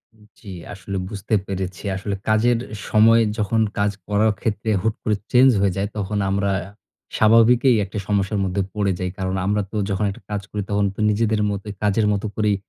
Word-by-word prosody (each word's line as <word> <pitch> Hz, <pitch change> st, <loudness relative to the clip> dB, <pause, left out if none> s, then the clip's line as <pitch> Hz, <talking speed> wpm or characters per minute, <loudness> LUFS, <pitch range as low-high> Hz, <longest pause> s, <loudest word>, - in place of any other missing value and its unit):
উম 105 Hz, -, -22 dB, 0.2 s
জি, 100 Hz, -, -10 dB, 0.2 s
আসলে 95 Hz, 0 st, -6 dB
বুঝতে 100 Hz, +2 st, -5 dB
পেরেছি। 95 Hz, 0 st, -5 dB
আসলে 100 Hz, +1 st, -3 dB
কাজের 115 Hz, +2 st, +3 dB, 0.3 s
সময় 115 Hz, +2 st, +5 dB, 0.2 s
যখন 110 Hz, +2 st, +1 dB, 0.2 s
কাজ 100 Hz, 0 st, +2 dB, 0.2 s
করার 105 Hz, +1 st, +2 dB
ক্ষেত্রে 110 Hz, 0 st, -2 dB
হুট 110 Hz, 0 st, 0 dB
করে 105 Hz, -, +1 dB, 0.2 s
চেঞ্জ 130 Hz, +1 st, +6 dB
হয়ে 100 Hz, -2 st, +2 dB
যায় 100 Hz, +1 st, 0 dB
তখন 105 Hz, 0 st, -2 dB
আমরা 100 Hz, 0 st, 0 dB, 0.7 s
স্বাভাবিকই 115 Hz, +3 st, +5 dB
একটা 100 Hz, +2 st, -7 dB
সমস্যার 100 Hz, 0 st, 0 dB
মধ্যে 95 Hz, +1 st, -1 dB
পড়ে 100 Hz, -2 st, 0 dB
যাই। 90 Hz, 0 st, -2 dB
কারণ 95 Hz, 0 st, -2 dB
আমরা 105 Hz, +1 st, +1 dB
তো -, -, -8 dB
যখন 100 Hz, +2 st, 0 dB
একটা -, -, -12 dB
কাজ 105 Hz, -, -2 dB
করি 105 Hz, -, -2 dB
তখন 100 Hz, 0 st, +1 dB
তো -, -, -13 dB
নিজেদের 110 Hz, 0 st, +1 dB
মতোই 100 Hz, +1 st, -5 dB
কাজের 105 Hz, +1 st, +2 dB
মতো 100 Hz, +1 st, -2 dB
করেই 105 Hz, -2 st, +1 dB
105 Hz, 185 wpm, -22 LUFS, 100-110 Hz, 0.7 s, চেঞ্জ